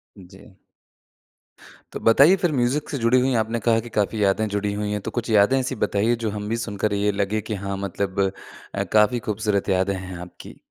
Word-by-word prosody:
जी। 95 0 -16 1.4
तो - - -5
बताइए 140 +11 +6
फिर 175 -3 0
म्यूज़िक 135 +2 0
से 140 - -3
जुड़ी 115 +2 +3
हुई 130 +1 +1
हैं, 125 - +2
आपने 115 +2 -1
कहा 115 0 +2
कि 120 +1 -8
काफ़ी 105 +1 +1
यादें 100 +2 +2
जुड़ी 100 0 -2
हुई 105 0 -3
हैं। 105 - -1
तो - - -5
कुछ 120 -1 -4
यादें 105 +4 +4
ऐसी 130 0 -2
बताइए, 105 +4 +1
जो 115 -2 -3
हम 105 0 -5
भी 115 - -1
सुनकर 105 -2 -2
ये 100 +1 +1
लगे 100 +2 -1
कि 110 +1 -4
हाँ 100 0 -3
मतलब 95 +1 -3 0.6
अ, - - 0
काफ़ी 110 +3 +3
खूबसूरत 105 -1 -1
यादें 95 +1 +1
हैं 95 0 -7
आपकी। 90 0 -12
105 Hz, 205 wpm, -23 LUFS, 100-115 Hz, 1.4 s, बताइए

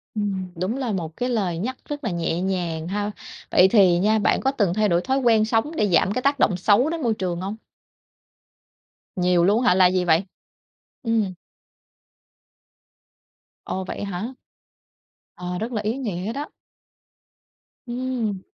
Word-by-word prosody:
Ừm, 195 -3 -2
đúng 185 +9 -2
là 255 -4 -2
một 165 -5 -4
cái 250 +1 -1
lời 195 -8 0
nhắc 255 +8 -3
rất 290 0 -6
là 225 - -1
nhẹ 170 0 -1
nhàng 175 -4 -2
ha! 205 +2 -2 0.4
Vậy 180 - +6
thì 190 -4 +5
nha 215 +3 +3
bạn - - +2
có 265 - +2
từng 205 -10 +1
thay 210 +1 +2
đổi 170 0 +2
thói 265 +6 0
quen 225 -4 +4
sống 225 +6 0
để 210 - +2
giảm 180 +3 +3
cái 255 - -1
tác 280 +1 +1
động 185 - +3
xấu 210 - +3
đến 330 0 -3
môi 235 -4 +1
trường 180 -4 -3
hông? 195 +3 -4 1.6
Nhiều 180 -2 +3
luôn 210 +6 +3
á 245 - +4
hả, - - +4
là 185 -1 +6
gì 180 0 +1
vậy? 170 +2 +3 0.8
Ừm. 225 -5 0 2.3
Ồ. 190 - -3
Vậy - - -5
hả? 200 +5 -4 1.0
Ờ, 180 0 -4
rất 225 +3 -3
là 215 -3 -2
ý 220 +4 -2
nghĩa 210 -5 -3
đó. 290 +3 -5 1.4
Ừm. 240 -5 -2
205 Hz, 165 wpm, -23 LUFS, 180-235 Hz, 2.3 s, Vậy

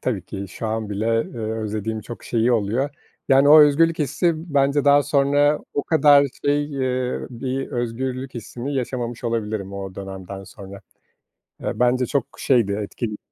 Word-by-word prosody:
tabii 110 -8 -2
ki 100 -1 -6
şu 110 - -6
an 110 -1 -3
bile, 105 +2 -2 0.2
eee, 120 - -10
özlediğim 110 0 -3
çok 120 +2 -10
şeyi 120 +1 +1
oluyor. 115 +5 0 0.4
Yani 135 +1 +5
o 155 +1 +9
özgürlük 160 +3 +4
hissi 150 +4 +1 0.2
bence 140 +1 +3
daha 145 0 +6
sonra 145 +1 +2 0.2
o 145 - 0
kadar 145 -3 +5 0.2
şey, 145 +1 +2
eee, 130 -3 -2
bir 130 +2 -4
özgürlük 125 +2 -3
hissini 120 +4 -6
yaşamamış 120 -2 -3
olabilirim 110 -4 -2
o 95 -1 -6
dönemden 95 0 -8
sonra. 100 +1 -11 0.8
Eee, - - -4
bence 125 +1 +3
çok 135 -1 -1
şeydi, 120 -7 +2
etkili 105 +2 -4
125 Hz, 155 wpm, -22 LUFS, 110-140 Hz, 0.8 s, o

